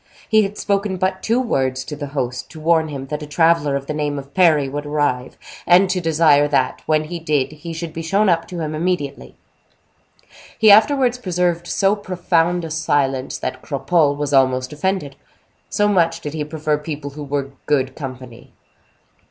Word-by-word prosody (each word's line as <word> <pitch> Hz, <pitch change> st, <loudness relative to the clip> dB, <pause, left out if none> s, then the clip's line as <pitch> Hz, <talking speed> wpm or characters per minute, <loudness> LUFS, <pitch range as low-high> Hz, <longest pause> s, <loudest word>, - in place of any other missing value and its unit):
He 220 Hz, -1 st, +4 dB
had 205 Hz, 0 st, -3 dB
spoken 200 Hz, -1 st, -1 dB
but 190 Hz, +1 st, -1 dB
two 230 Hz, +3 st, +1 dB
words 130 Hz, -, -1 dB
to 150 Hz, -, -7 dB
the 145 Hz, 0 st, -6 dB
host, 125 Hz, -3 st, -4 dB
to 160 Hz, -, -11 dB
warn 160 Hz, 0 st, +2 dB
him 140 Hz, -3 st, -6 dB
that 150 Hz, 0 st, -3 dB
a 150 Hz, -, -7 dB
traveler 160 Hz, -1 st, +2 dB
of 140 Hz, 0 st, -3 dB
the 150 Hz, -, -4 dB
name 150 Hz, -1 st, -2 dB
of 140 Hz, 0 st, -9 dB
Parry 160 Hz, -7 st, +4 dB
would 145 Hz, +2 st, -4 dB
arrive, 145 Hz, -4 st, -1 dB, 0.3 s
and 185 Hz, +2 st, +5 dB
to 180 Hz, 0 st, -1 dB
desire 155 Hz, -3 st, +4 dB
that, 135 Hz, -3 st, 0 dB
when 155 Hz, -1 st, +2 dB
he 170 Hz, +2 st, -6 dB
did, 150 Hz, -5 st, 0 dB
he 155 Hz, +2 st, -8 dB
should 165 Hz, 0 st, -6 dB
be 165 Hz, -, -5 dB
shown 195 Hz, +6 st, +1 dB
up 165 Hz, -2 st, +2 dB
to 175 Hz, -2 st, -6 dB
him 155 Hz, -1 st, -3 dB
immediately. 155 Hz, -4 st, -3 dB, 1.2 s
He 220 Hz, -2 st, +6 dB
afterwards 250 Hz, +3 st, +4 dB
preserved 175 Hz, -4 st, -1 dB
so 195 Hz, +1 st, +2 dB
profound 175 Hz, -3 st, 0 dB
a 160 Hz, -, -7 dB
silence, 140 Hz, -4 st, 0 dB
that 130 Hz, -, -5 dB
Cropole 145 Hz, +1 st, +1 dB
was 145 Hz, -1 st, -3 dB
almost 130 Hz, 0 st, +2 dB
offended, 165 Hz, -3 st, -2 dB, 0.5 s
so 205 Hz, -, +1 dB
much 170 Hz, -5 st, +2 dB
did 150 Hz, -, -6 dB
he 155 Hz, -1 st, -2 dB
prefer 150 Hz, -1 st, -1 dB
people 150 Hz, -2 st, -6 dB
who 150 Hz, +1 st, -8 dB
were 140 Hz, -1 st, -3 dB, 0.2 s
good 135 Hz, -2 st, +1 dB
company. 130 Hz, -4 st, -9 dB
155 Hz, 185 wpm, -20 LUFS, 140-180 Hz, 1.2 s, He